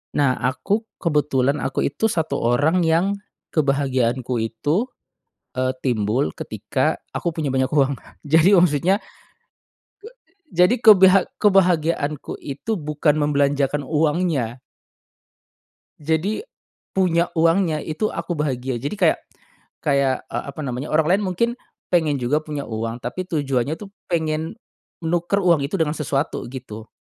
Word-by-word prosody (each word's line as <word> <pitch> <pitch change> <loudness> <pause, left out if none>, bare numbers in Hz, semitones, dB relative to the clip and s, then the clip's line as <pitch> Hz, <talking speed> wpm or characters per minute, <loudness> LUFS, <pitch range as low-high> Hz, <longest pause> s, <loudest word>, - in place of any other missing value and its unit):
Nah, 140 -3 +2
aku 195 - -1 0.2
kebetulan 145 -3 +1
aku - - -1
itu 150 +11 0
1 160 -8 -1
orang 145 +9 +2
yang, 165 +3 +3 0.5
kebahagiaanku 130 -4 0
itu, 145 - -1 0.7
eee, 130 0 0
timbul 110 - 0
ketika - - -2 0.2
aku 170 -2 -2
punya 155 -4 -1
banyak 130 0 +2
uang 140 -2 +2
Kak. - - -20
Jadi 160 +6 +5
maksudnya, 180 - +3 1.5
jadi, 180 - +4
kebehag 195 -4 +7
kebahagiaanku 170 -7 +2
itu 145 +10 -5
bukan 150 -2 0
membelanjakan 145 -1 +1
uangnya. 150 -5 0 1.4
Jadi, 160 - -1 0.5
punya 175 -2 +2
uangnya 165 0 +3
itu 170 +7 -1
aku 170 +1 -4
bahagia 130 -5 -2
jadi 145 +9 -3
kayak 180 -5 +3 0.7
kayak, 140 -2 +1
eee, - - -2
apa 140 - -7
namanya 130 +2 -4
orang 160 +3 +3
lain 210 - -3
mungkin 210 +6 +1 0.4
pengen 155 -5 +3
juga 145 +6 +1
punya 150 -2 -5
uang 115 +1 -4
tapi 125 +10 -4
tujuannya 145 -3 -1
tuh 205 - -9 0.2
pengen, 160 +2 -1 0.5
nuker 175 +4 +1
uang 170 -4 +4
itu 160 +7 -2
dengan 155 -2 +1
sesuatu 145 0 -1
gitu. 115 -4 -9
150 Hz, 125 wpm, -22 LUFS, 135-170 Hz, 1.5 s, kebehag